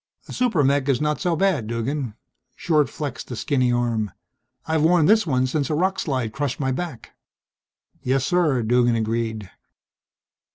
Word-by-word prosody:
"A - - -8
super 225 -12 +1
mech 140 0 +2
is 130 -3 +2
not 150 -2 -1
so 175 -2 +1
bad, 160 - +1
Duggan." 115 +1 -3 0.4
Short 150 -6 +1
flexed 150 0 -6
a 125 - -4
skinny 130 0 +1
arm. 120 -3 0 0.6
"I've 160 -1 0
worn 165 0 +4
this 215 +1 +4
one 130 -3 +2
since 140 +1 -1
a 155 - 0
rock 190 +4 0
slide 130 -7 -2
crushed 140 -3 -2
my 135 -2 0
back." 130 -3 -5 0.9
"Yes, 130 +1 0
sir," 155 -9 +2
Duggan 120 +1 +3
agreed. 110 -3 -2
135 Hz, 160 wpm, -23 LUFS, 120-155 Hz, 0.9 s, worn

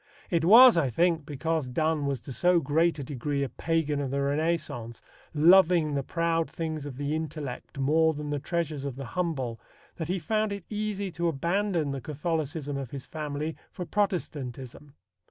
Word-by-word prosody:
It 170 -3 +2
was, 230 +5 +9
I 145 -6 +2
think, 165 +3 +1
because 155 0 -1
Donne 155 +3 0
was 135 -4 -2
to 135 - -9
so 180 +5 +3
great 160 +3 +2
a 140 - -4
degree 140 +1 -2
a 135 - -2
pagan 160 -3 -1
of 135 - -2
the 140 +1 -1
Renaissance, 145 -6 -1 0.3
loving 170 -1 +5
the 140 - 0
proud 165 +2 0
things 155 -3 -4
of 130 -3 -8
the 145 +1 -2
intellect 155 -5 -5
more 160 +4 +3
than 150 0 -5
the 145 - -1
treasures 155 -2 -2
of 140 -3 -4
the 135 0 -6
humble, 140 -10 -2 0.4
that 160 - -3
he 185 +2 0
found 215 +4 0
it 200 -3 -7
easy 205 -2 -2
to 170 +1 -1
abandon 170 +1 0
the 135 -1 -4
Catholicism 155 -1 -3
of 135 -3 -5
his 135 -1 -7
family 150 0 -4
for 180 - -6
Protestantism. 145 - -3
155 Hz, 175 wpm, -28 LUFS, 140-170 Hz, 0.4 s, was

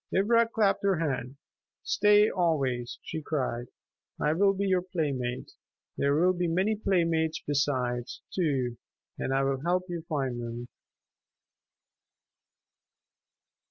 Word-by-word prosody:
Ivra 230 +4 +4
clapped 215 -3 +1
her 195 -2 +2
hands. 135 -5 -2 0.5
"Stay 210 +1 +5
always," 135 - 0
she 160 - -5
cried. 130 -5 -2 0.5
"I 150 - +2
will 195 +4 +4
be 200 +1 -1
your 185 -2 +2
playmate. 140 -9 -3 0.4
There 140 0 +2
will 180 +4 +4
be 175 -1 -1
many 190 +6 +1
playmates 165 -6 +1
besides, 130 -4 -1
too, 135 - 0 0.4
and - - -2
I 135 0 +2
will 135 -1 0
help 180 +3 +1
you 170 -1 -3
find 135 -6 -1
them." 120 +1 -6
160 Hz, 120 wpm, -28 LUFS, 130-185 Hz, 0.5 s, Stay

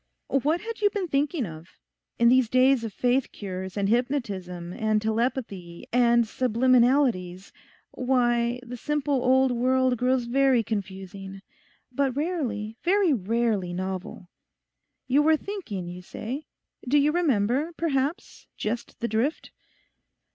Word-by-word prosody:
'What 295 +5 +1
had 455 0 -6
you 410 - +5
been 400 -3 -3
thinking 285 -1 0
of? 160 -1 -9 0.5
In 235 - +4
these 255 -2 +4
days 255 0 +4
of 225 - -4
faith 250 +5 0
cures, 190 -1 -6
and 200 -1 +1
hypnotism, 200 -8 -2
and 215 +1 +1
telepathy, 220 -6 -3
and 235 -1 +4
subliminalities—why, 240 0 +1
the 245 +1 -7
simple 290 -1 -1
old 260 0 +4
world 255 +1 +2
grows 250 0 +1
very 260 -1 +3
confusing. 195 -1 -6 0.5
But 265 0 0
rarely, 250 -10 -2
very 370 -2 +3
rarely 215 -4 0
novel. 185 -1 -5 0.8
You 275 +3 +3
were 315 +1 +4
thinking, 290 - -6
you 180 +1 -7
say; 250 - -6 0.4
do 290 - +4
you 290 +1 +4
remember, 285 -2 +1
perhaps, 290 -1 -2
just 230 +3 -4
the 235 - 0
drift? 235 +8 -1
245 Hz, 125 wpm, -26 LUFS, 210-275 Hz, 0.8 s, you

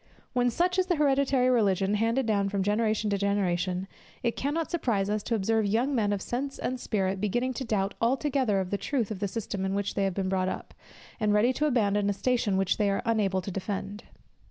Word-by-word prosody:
When 245 -1 +2
such 360 +8 +1
is 370 - +2
the 355 - +2
hereditary 275 -3 +2
religion 200 -4 +2
handed 230 +5 +1
down 200 -3 +1
from 200 -1 -1
generation 215 +1 +1
to 200 - 0
generation, 185 -2 0 0.4
it 235 - 0
cannot 300 +4 -2
surprise 215 - 0
us 210 0 0
to 230 - -1
observe 220 +1 +1
young 235 +7 +1
men 215 -5 +1
of 200 -2 -2
sense 270 +3 -3
and 255 0 -3
spirit 195 -4 -1
beginning 240 +5 0
to 255 - -4
doubt 200 -4 -1
altogether 255 -3 +1
of 185 -1 -3
the 200 - -1
truth 245 -7 -1
of 205 - -4
the 200 - -1
system 200 -2 -4
in 190 0 -1
which 200 0 -1
they 200 - 0
have 190 -2 -1
been 195 -1 -1
brought 185 -1 0
up, - - -6 0.5
and 210 -2 +2
ready 235 +5 +4
to 300 +4 +1
abandon 205 -6 +2
a - - +1
station 210 -1 0
which 195 -1 +1
they 210 -2 +2
are 195 - -1
unable 205 -5 +1
to 195 - -5
defend. 200 +2 -4
210 Hz, 220 wpm, -28 LUFS, 195-245 Hz, 0.5 s, ready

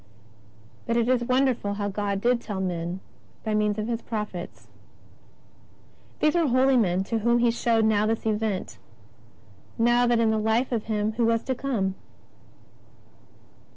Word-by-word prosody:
But 235 0 +1
it 235 -1 +2
is 250 -1 +2
wonderful 250 -5 +1
how 205 0 -3
much 205 - -3
God 200 -1 -2
did 240 +1 +2
tell 205 -5 -5
men 175 0 -3 0.4
by 220 - -2
means 210 0 +1
of 215 0 -2
His 235 -1 -2
prophets. 210 -6 -6 1.6
These 305 - +3
were 340 -3 +2
holy 260 +1 +3
men 190 -6 +2
to 225 +3 -2
whom 235 +2 +2
He 240 -1 +3
showed 230 -1 +1
now 215 -1 +2
this 225 0 -2
event, 215 -3 -2 1.0
now 240 +1 +3
that 240 -1 +3
in 225 -1 +3
the 220 - +1
Life 220 +4 +1
of 230 -3 -1
Him 215 -1 -1
who 235 - +2
was 230 0 +1
to 260 - -1
come. 235 -7 -1
225 Hz, 160 wpm, -25 LUFS, 210-240 Hz, 1.6 s, These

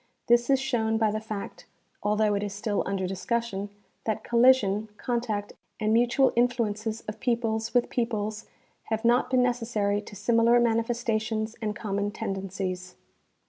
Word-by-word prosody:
This 240 +1 +3
is 270 -1 +4
shown 230 -4 0
by 220 -1 +2
the 215 - -2
fact, 215 -2 -7 0.3
although 210 0 +2
it 200 - 0
is 205 -1 -3
still 210 0 -1
under 195 -1 -1
discussion, 205 +1 -2 0.4
that 220 -2 -1
col 235 - 0
lision, 220 -5 +4
contact 230 -4 -2 0.3
and 215 0 +1
mutual 245 +3 +3
influences 225 -3 0
of 215 - -7
peoples 230 -2 -1
with 245 - +4
peoples 215 -3 -2 0.4
have 220 +1 -2
not 240 +2 +3
been 255 -1 +3
necessary 230 -4 0
to 205 - -12
similar 230 +3 +4
manifestations 225 -1 0
and 210 -1 -2
common 205 -2 -2
tendencies. 190 -3 -4
220 Hz, 145 wpm, -27 LUFS, 205-235 Hz, 0.4 s, is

